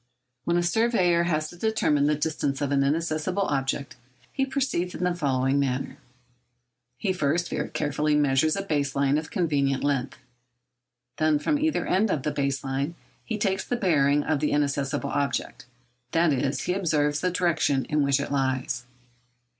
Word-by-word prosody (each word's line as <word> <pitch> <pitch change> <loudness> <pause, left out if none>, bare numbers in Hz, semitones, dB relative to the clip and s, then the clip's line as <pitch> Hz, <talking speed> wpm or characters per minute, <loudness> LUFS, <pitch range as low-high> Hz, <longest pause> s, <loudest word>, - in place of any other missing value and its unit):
When 170 0 +2
a 175 - +2
surveyor 180 -3 +2
has 155 -2 0
to - - -12
determine 170 -8 +1
the 150 - +2
distance 145 -2 -1
of 145 -1 -1
an 140 -1 +3
inaccessible 160 +6 0
object, 140 -3 -2 0.4
he 270 0 0
proceeds 260 - -1
in - - -4
the 180 0 +2
following 135 -4 +1
manner. 135 0 -2 1.0
He 195 -3 -1
first 170 +1 0
very - - -2
carefully 150 +1 0
measures 145 +1 +3
a 195 - -2
base 145 -6 -1
line 140 +1 +2
of 155 - -8
convenient 140 -8 0
length. 140 -2 -1 1.0
Then 155 0 +3
from 290 - 0
either 315 +1 0
end 205 +4 +2
of 145 -7 -1
the 150 - 0
base 140 -2 -1
line 140 +5 -2 0.3
he 220 - -3
takes 195 -2 0
the 245 - -2
bearing 145 - +2
of 155 -3 0
the 150 - 0
inaccessible 140 -1 0
object—that 125 +2 -2
is, 135 +1 -1
he 180 - 0
observes 150 -6 +1
the 180 - +1
direction 170 -6 +1
in 150 0 0
which 140 -1 +2
it 140 - -4
lies. 130 -3 -1
150 Hz, 165 wpm, -26 LUFS, 140-175 Hz, 1.0 s, an